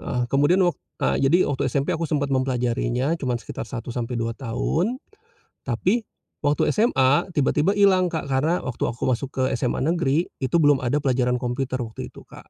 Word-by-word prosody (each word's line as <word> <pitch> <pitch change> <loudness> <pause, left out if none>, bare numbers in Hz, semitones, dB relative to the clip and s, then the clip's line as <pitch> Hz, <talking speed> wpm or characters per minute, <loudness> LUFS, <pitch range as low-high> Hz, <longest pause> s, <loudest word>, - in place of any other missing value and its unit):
heeh, 125 0 -2
kemudian 150 +7 +4
wak 175 - +2 0.3
a - - +1
jadi 150 +7 +4
waktu 140 -2 -1
SMP 140 +2 0
aku 160 -1 -2
sempat 140 -2 0
mempelajarinya 125 +1 0
cuman 125 -3 0
sekitar 120 - -7
1 120 -2 -6
sampai 120 0 -3
2 115 0 -1
tahun. 155 - -1 0.7
Tapi, 180 - 0 0.4
waktu 145 +1 +1
SMA 145 - +3
tiba 140 - +3
tiba 185 +7 +2
ilang, 190 -3 +4
Kak, 160 -3 -3
karena 140 +6 +1
waktu 125 - -6
aku 120 - -4
masuk 130 +1 0
ke 130 - -2
SMA 125 0 -1
Negeri 165 -1 +1 0.2
itu 130 +5 +1
belum 145 -5 +4
ada 125 +3 0
pelajaran 125 -3 +1
komputer 130 +1 -2
waktu 115 -3 -6
itu, - - -15
Kak. - - -15
135 Hz, 185 wpm, -23 LUFS, 125-160 Hz, 0.7 s, kemudian